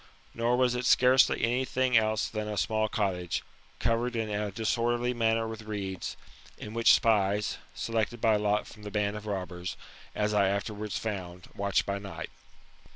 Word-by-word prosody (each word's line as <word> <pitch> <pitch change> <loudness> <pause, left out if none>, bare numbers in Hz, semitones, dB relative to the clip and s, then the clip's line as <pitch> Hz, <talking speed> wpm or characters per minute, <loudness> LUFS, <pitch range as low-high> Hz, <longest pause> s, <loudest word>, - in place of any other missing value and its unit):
Nor 120 +1 +1
was 125 -1 +3
it 125 0 -1
scarcely 125 +1 +5
any 120 +3 +2
thing 130 -1 +1
else 110 -1 +3
than 110 -1 -4
a 105 -1 -4
small 110 +2 +1
cottage, 90 -5 -1 0.3
covered 120 - 0
in 110 -2 -1
a 105 0 -1
disorderly 120 +3 0
manner 115 -1 +1
with 110 0 -6
reeds; 100 -4 -5 0.4
in 105 - -8
which 115 0 +6
spies, 105 -2 +1 0.2
selected 115 +1 -1
by 110 -1 +4
lot 105 0 +1
from 105 - -13
the 105 - -6
band 105 0 0
of 105 0 -7
robbers, 90 -3 -4 0.4
as 105 0 0
I 100 -2 +4
afterwards 105 +1 -3
found, 90 -5 -5
watched 100 -1 +1
by 100 0 -2
night. 100 -1 -7
110 Hz, 165 wpm, -29 LUFS, 100-115 Hz, 0.4 s, which